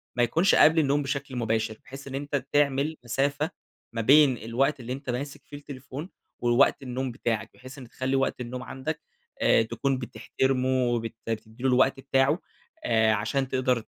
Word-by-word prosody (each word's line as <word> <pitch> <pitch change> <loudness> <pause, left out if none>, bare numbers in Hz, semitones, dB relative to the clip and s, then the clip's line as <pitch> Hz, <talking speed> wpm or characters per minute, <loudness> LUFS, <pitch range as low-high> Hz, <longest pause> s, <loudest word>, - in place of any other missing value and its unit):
ما 120 - +3
يكونش 165 +11 +3
قبل 160 +2 +6
النوم 145 -1 +2
بشكل 140 -1 -4
مباشر؛ 110 -2 -1
بحيث 135 +1 -10
إن 135 - -5
أنت 140 -1 -2
تعمل 145 +1 +2
مسافة 140 +5 0 0.4
ما 115 - -1
بين 140 +1 +6
الوقت 130 +7 0
اللي 125 +1 -5
أنت 135 0 -7
ماسك 135 +4 -4
فيه 145 - -9
التليفون 145 +3 -8 0.3
ووقت 120 +3 +3
النوم 130 0 -3
بتاعك؛ 115 -3 -2
بحيث 130 +2 -12
إن 125 -4 -10
تخلي 130 +2 -2
وقت 135 -1 0
النوم 125 +1 -5
عندك، 150 +4 -5 0.4
آآ، - - +5
تكون 120 +4 -1
بتحترمه 130 +1 -1
وبت 120 -3 0
بتدِّي 110 +2 -5
له 135 - +3
الوقت 130 +2 +3
بتاعه، 135 +4 +2 0.5
آآ، 110 -1 +3
عشان 115 +6 -1
تقدر 125 -2 0
130 Hz, 170 wpm, -27 LUFS, 120-140 Hz, 0.5 s, قبل